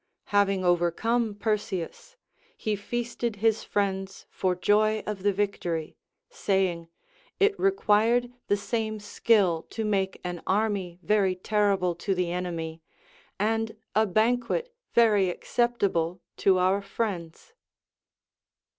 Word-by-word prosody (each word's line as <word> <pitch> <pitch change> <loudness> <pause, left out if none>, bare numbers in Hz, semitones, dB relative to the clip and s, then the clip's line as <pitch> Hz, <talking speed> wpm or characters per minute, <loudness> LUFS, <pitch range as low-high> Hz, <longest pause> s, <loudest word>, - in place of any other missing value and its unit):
Having 195 -2 +3
overcome 205 +6 +1
Perseus, 210 - -3 0.4
he 215 -1 -1
feasted 235 +2 -3
his 220 +1 +1
friends 195 -1 -2
for 185 -1 0
joy 215 +3 +2
of 210 -2 -4
the 205 +1 +3
victory, 180 -5 -2 0.3
saying, 190 - 0 0.5
it 410 +1 +4
required 240 - +3 0.2
the 205 - +2
same 220 +1 -2
skill 205 -5 +2
to 225 - -3
make 195 -2 0
an 175 -1 -4
army 195 -3 0
very 200 -3 +2
terrible 195 -2 +1
to 190 +3 -2
the 180 -1 -1
enemy, 165 -2 -4 0.6
and 225 +1 0 0.2
a 220 +1 +3
banquet 245 - +1 0.2
very 210 -5 +5
acceptable 190 -5 0 0.2
to 190 -1 +3
our 185 +2 +2
friends. 195 - -4
205 Hz, 110 wpm, -27 LUFS, 185-220 Hz, 0.6 s, very